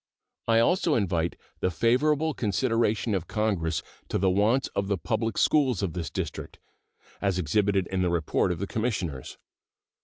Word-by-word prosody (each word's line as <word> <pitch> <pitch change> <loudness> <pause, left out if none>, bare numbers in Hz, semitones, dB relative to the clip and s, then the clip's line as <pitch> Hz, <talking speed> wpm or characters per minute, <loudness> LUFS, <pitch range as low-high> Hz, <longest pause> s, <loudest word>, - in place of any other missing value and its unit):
I 115 -1 +4
also 165 +6 +3
invite 85 -6 0 0.2
the - - +1
favorable 145 - +2
consideration 115 0 0
of 90 -4 -2
Congress 85 -8 -1 0.3
to - - 0
the 95 0 +2
wants 110 +8 +2
of 100 0 -2
the 100 -1 0
public 110 +3 -2
schools 130 -10 +3
of 90 -5 -2
this 85 -3 -4
District, - - -5 0.6
as 100 -2 +1
exhibited 95 +3 +1
in 95 +1 -2
the 90 - +2
report 85 +1 +1
of 90 - -2
the 100 - -3
Commissioners. 95 - -3
100 Hz, 155 wpm, -27 LUFS, 90-115 Hz, 0.6 s, I